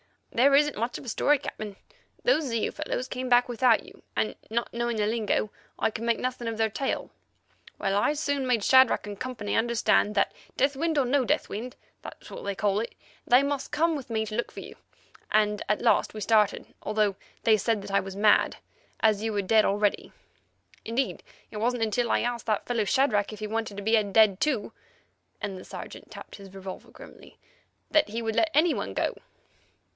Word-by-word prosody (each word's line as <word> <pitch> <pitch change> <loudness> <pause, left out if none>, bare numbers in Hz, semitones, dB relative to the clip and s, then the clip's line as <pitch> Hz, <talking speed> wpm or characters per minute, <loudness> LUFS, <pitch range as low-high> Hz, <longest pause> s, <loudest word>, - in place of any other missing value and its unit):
"There 275 +4 +4
isn't 295 +1 +3
much 235 +3 -2
of - - -10
a - - -4
story, 290 +6 +3
Captain. 215 -6 -7 0.5
Those 320 -11 +3
Zeu 230 -4 -1
fellows 255 - -3
came 255 0 -4
back 245 0 +5
without 245 -1 +3
you, - - -16
and, 215 - 0
not 235 +2 -2
knowing 235 -1 -1
the 210 - +1
lingo, 215 -1 0 0.3
I - - +1
could 220 +2 -5
make 235 -1 +2
nothing 250 -2 -3
of 225 -1 -3
their 225 0 +2
tale. 265 +6 -3 0.7
Well, 195 - -1
I 205 +8 +2
soon 285 -3 -1
made 235 -5 +2
Shadrach 260 -2 +5
and 205 -1 -7
Co. 255 0 -4 0.2
understand 225 -2 +2
that, - - +2 0.2
death 275 +2 +2
wind 320 +2 -1
or 275 - +3
no 265 +2 +2
death - - 0
wind—that's 245 +5 -9
what - - -8
they 200 -1 -2
call 205 0 +1
it—they 245 +3 0
must 280 -1 -2
come 330 +1 +2
with 270 -3 -7
me 220 -1 -1
to 215 - -7
look 240 +2 -2
for - - -8
you, - - -10 0.6
and 210 -1 +2
at 210 - +1
last - - +2
we 215 - -5
started, 215 -1 +2
although 210 -1 +1 0.3
they 220 -1 +5
said 215 0 0
that - - -7
I 200 - +4
was 190 0 -6
mad, 210 +1 +4 0.5
as 215 -2 +3
you 220 0 -2
were 205 - +1
dead 215 +3 +4
already. 205 0 0 0.7
Indeed, 235 +4 -2 0.3
it 215 - -7
wasn't 235 +2 0
until 230 +2 0
I - - +2
asked 240 -1 -3
that 215 -2 0
fellow 235 -3 0
Shadrach 215 -3 +2
if 215 - -9
he 215 - -4
wanted 220 -2 -3
to 200 - -5
be 220 +1 +4
dead 205 -1 +4
too"—and 215 -6 -5
the 185 - -10
Sergeant - - -9
tapped - - -10
his 195 -2 -13
revolver 190 -1 -8
grimly—"that 310 -8 -5
he 230 +2 -4
would 225 -1 -2
let 330 - +3
any 315 +2 +4
one 100 - -4
go. - - -1
225 Hz, 195 wpm, -27 LUFS, 210-255 Hz, 0.7 s, back